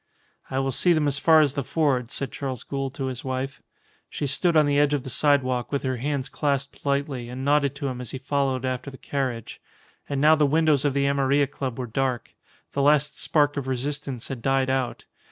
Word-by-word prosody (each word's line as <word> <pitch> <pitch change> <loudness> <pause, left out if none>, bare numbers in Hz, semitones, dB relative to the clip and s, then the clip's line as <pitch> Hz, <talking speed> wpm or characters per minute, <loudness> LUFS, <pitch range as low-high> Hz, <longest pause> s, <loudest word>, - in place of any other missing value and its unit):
"I 130 - -3
will 135 0 0
see 175 +7 +3
them 155 -2 +1
as 145 0 +1
far 160 +1 +6
as 145 -3 +2
the 140 - -2
ford," 135 -3 0
said 135 0 -3
Charles 130 -4 -5
Gould 135 -1 -4
to 135 - -3
his 130 +2 -5
wife. 130 +1 -4 0.5
She 150 - -3
stood 160 +5 +2
on 155 - +6
the 145 0 +2
edge 145 0 +3
of 140 - -3
the 130 - -6
sidewalk 130 -4 +1
with 140 - -1
her 130 -1 -1
hands 140 +1 -2
clasped 140 -2 -2
lightly, 140 -3 -1
and 130 +2 -5
nodded 140 -1 +2
to 140 -1 -3
him 125 -1 -4
as 125 - -7
he - - -4
followed 135 -1 -1
after 130 +1 -3
the 135 - -11
carriage. 130 -6 -4 0.5
And 140 -1 -1
now 155 +2 +6
the 150 -2 +3
windows 155 -1 +3
of 140 -2 +1
the 140 0 +2
Amarilla 140 0 +2
Club 135 -3 -5
were 130 - -3
dark. 125 0 -2 0.4
The 140 - -1
last 150 +1 +3
spark 145 -2 +2
of 135 -2 -3
resistance 135 -1 -3
had 130 -4 -5
died 135 +1 +1
out. 130 -2 -2
140 Hz, 220 wpm, -25 LUFS, 130-145 Hz, 0.5 s, far